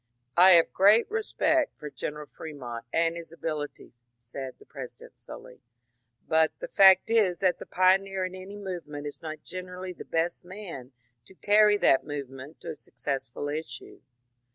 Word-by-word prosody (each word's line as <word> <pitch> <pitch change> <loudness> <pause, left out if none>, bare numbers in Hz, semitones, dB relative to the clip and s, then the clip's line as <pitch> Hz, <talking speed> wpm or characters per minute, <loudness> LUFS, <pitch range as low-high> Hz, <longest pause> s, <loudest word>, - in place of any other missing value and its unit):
^^ - - -53 0.3
I 185 +2 +8
have 170 -1 +5
great 205 +4 +6
respect 320 -8 +1
for 150 -1 -8
General 150 +1 -5
Fremont 130 -8 -8
and 165 +2 +1
his 170 -2 -8
abilities," 155 -5 -5 0.2
said 125 +3 -8
the - - -18
President - - -11
slowly, - - -11
^^ - - -38 0.7
but 160 0 +3
the - - -6
fact 195 +3 +6
is 205 -6 +3
that 185 0 +1
the - - -9
pioneer 190 +1 +2
in 185 - -6
any 190 +2 -9
movement 175 -7 -6
is 145 - -6
not 155 -1 -7
generally 185 0 -7
the - - -10
best 165 +1 -1
man 175 -9 -9 0.3
to 190 - -17
carry 210 +1 +4
that 135 -9 +4
movement 140 0 -7
to - - -5
a - - -7
successful 135 -2 -5
issue. 155 +2 -6
170 Hz, 165 wpm, -27 LUFS, 145-190 Hz, 0.7 s, I